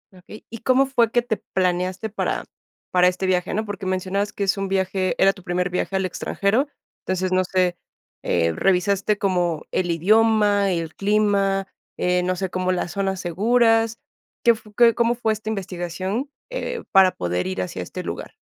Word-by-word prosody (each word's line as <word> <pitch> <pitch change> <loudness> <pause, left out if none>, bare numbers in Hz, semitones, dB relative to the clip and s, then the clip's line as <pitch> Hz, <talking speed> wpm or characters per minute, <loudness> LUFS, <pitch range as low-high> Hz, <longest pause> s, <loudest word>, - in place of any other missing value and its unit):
Okey, 185 +4 -13
¿y 230 - -7
cómo 260 +3 +3
fue 235 -4 +2
que 240 -1 +2
te 225 -3 -2
planeaste 185 +3 -1
para - - -2 0.5
para 180 0 +5
este 185 +1 0
viaje? 185 0 0
¿No?, 215 +1 -1
porque 195 -2 -5
mencionabas 185 +2 -1
que 200 - -3
es 195 - +2
un 195 - -1
viaje, 190 -1 0
era 195 0 +4
tu 190 - -15
primer 180 0 -1
viaje 185 +1 -2
al 190 -1 +1
extranjero, 215 +8 0 0.3
entonces 185 0 -2
no 185 0 +3
sé, 180 -1 +1 0.5
eh, 85 -1 +1
¿revisaste 200 +2 +1
como 175 -5 0
el 175 -2 0
idioma 205 +2 +3
y 175 - 0
el 165 -1 -6
clima, 200 -1 +1 0.3
eh, 180 0 +1
no 185 +1 0
sé, 190 -1 -3
como 185 0 0
las 175 -2 -2
zonas 195 +1 -2
seguras? 225 +5 +2 0.5
¿Qué 235 - +6
fu 215 -2 -13
qué 235 0 +6
cómo 235 0 +1
fue 220 -2 0
esta 215 0 -6
investigación?, 190 - -3 0.2
eh, - - -4
para 190 -1 +7
poder 90 0 -2
ir 95 0 -2
hacia 90 0 -5
este 90 - -6
lugar. - - -6
195 Hz, 180 wpm, -22 LUFS, 180-215 Hz, 0.5 s, para